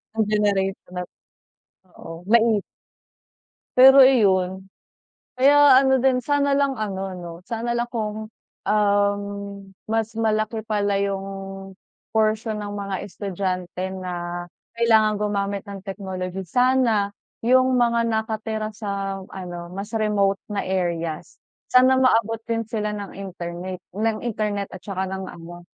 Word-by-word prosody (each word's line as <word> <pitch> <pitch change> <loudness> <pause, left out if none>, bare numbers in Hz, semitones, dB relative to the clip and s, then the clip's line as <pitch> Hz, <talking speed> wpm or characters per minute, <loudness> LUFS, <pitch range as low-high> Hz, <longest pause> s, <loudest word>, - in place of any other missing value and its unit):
ang 220 -1 +2
generation 195 -3 0
na 180 - -2 0.6
'to. 185 - -36
Oo, 165 +1 -9
nait 230 -3 +4 1.2
Pero 265 +1 +10
iyon, 190 -7 +3 0.7
kaya 285 -1 +7
ano 265 -1 +3
din, 260 -1 +4
sana 285 +2 +1
lang 275 -1 +1
ano, 195 -4 -4
'no, 175 -2 -7 0.2
sana 235 +1 -2
lang 240 0 0
kung, 215 -2 -4 0.4
um, 205 -1 +2 0.7
mas 225 0 0
malaki 220 0 0
pala 205 -2 +1
yung 195 -1 -4 0.4
portion 220 0 +1
ng 205 0 -5
mga 200 -1 -3
estudyante 185 -2 -4
na 175 -1 -4 0.3
kailangan 220 -2 +4
gumamit 200 -1 -1
ng 200 -1 -7
technology. 190 -1 -5
Sana 230 -1 +2 0.2
yung 255 +1 +3
mga 235 -1 +3
nakatira 220 -1 -2
sa 195 -2 -4
ano, 175 -2 -8
mas 200 +4 -6
remote 200 -3 +1
na 205 - -1
areas, 170 -4 -2 0.3
sana 255 +1 +6
maabot 225 -3 +2
din 230 -1 -2
sila 210 -2 -2
ng 205 -2 -6
interneyt 180 -1 -6 0.2
ng 220 +1 0
internet 210 -3 -2
at 185 - -11
tsaka 190 -1 -3
ng 190 0 -5
ano. 175 +1 -11
205 Hz, 125 wpm, -23 LUFS, 190-225 Hz, 1.2 s, Pero